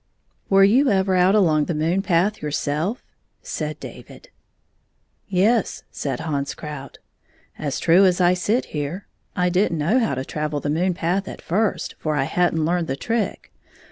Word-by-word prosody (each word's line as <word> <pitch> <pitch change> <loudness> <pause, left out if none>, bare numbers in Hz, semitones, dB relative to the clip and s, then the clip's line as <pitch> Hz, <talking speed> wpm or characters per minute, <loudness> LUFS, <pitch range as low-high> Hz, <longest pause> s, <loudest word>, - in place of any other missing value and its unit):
"Were 195 0 +6
you 255 +8 +5
ever 190 -1 +2
out 185 +2 +4
along 155 -7 +3
the 170 - -2
moon 165 +5 +1
path 195 +2 +1
your 150 - -3
self? 155 - -2 0.2
" - - -47
said - - -3
David. - - -11 0.5
" - - -46
Yes," 205 +3 +1
said 135 -2 -4
Hans 145 -3 -2
Krout. 150 -3 -8 0.3
" - - -33
As 140 - -3
true 175 +4 +5
as 180 -1 +2
I 180 0 +4
sit 205 +7 0
here. 150 +6 -4 0.3
I 180 0 +2
did 185 +2 +2
n't 165 - -2
know 170 +12 +2
how 225 - 0
to 130 +1 -4
travel 150 0 -3
the 145 - -2
moon 175 +3 +1
path 180 +3 -1
at - - -7
first, 185 -1 -1
for 155 -1 -1
I 140 - +1
had 175 +5 +1
n't 160 -1 +1
learned 170 0 0
the 135 - -2
trick. 225 - -3
175 Hz, 190 wpm, -22 LUFS, 150-195 Hz, 0.5 s, Were